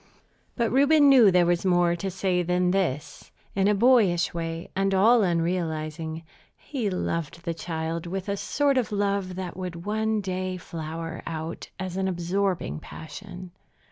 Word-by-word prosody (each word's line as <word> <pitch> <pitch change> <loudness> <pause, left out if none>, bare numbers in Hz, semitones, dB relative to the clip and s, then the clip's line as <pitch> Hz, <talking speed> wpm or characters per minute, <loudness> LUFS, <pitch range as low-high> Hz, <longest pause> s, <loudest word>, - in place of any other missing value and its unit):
But 235 -2 0
Reuben 285 +2 +5
knew 250 -7 +8
there 180 -1 +4
was 175 0 +1
more 175 -2 +3
to 190 +3 -3
say 185 -1 0
than 180 +1 +1
this. 150 -6 -2 0.2
In 195 0 +2
a 210 - +3
boyish 200 -7 +4
way, 165 0 -4
and 195 0 +1
all 225 +5 +5
unrealizing, 165 -3 -1 0.3
he 245 -8 -3
loved 170 -2 -3
the 170 - -1
child 165 0 -4
with 190 +2 -4
a 200 - 0
sort 280 +6 +1
of 240 - -2
love 200 -2 -1
that 185 -2 -5
would 180 -2 -6
one 220 +1 0
day 185 -1 -3
flower 165 -1 -6
out 160 0 -5
as 185 -1 -4
an 190 0 0
absorbing 180 - -1
passion. 180 - -9
180 Hz, 155 wpm, -26 LUFS, 170-200 Hz, 0.3 s, knew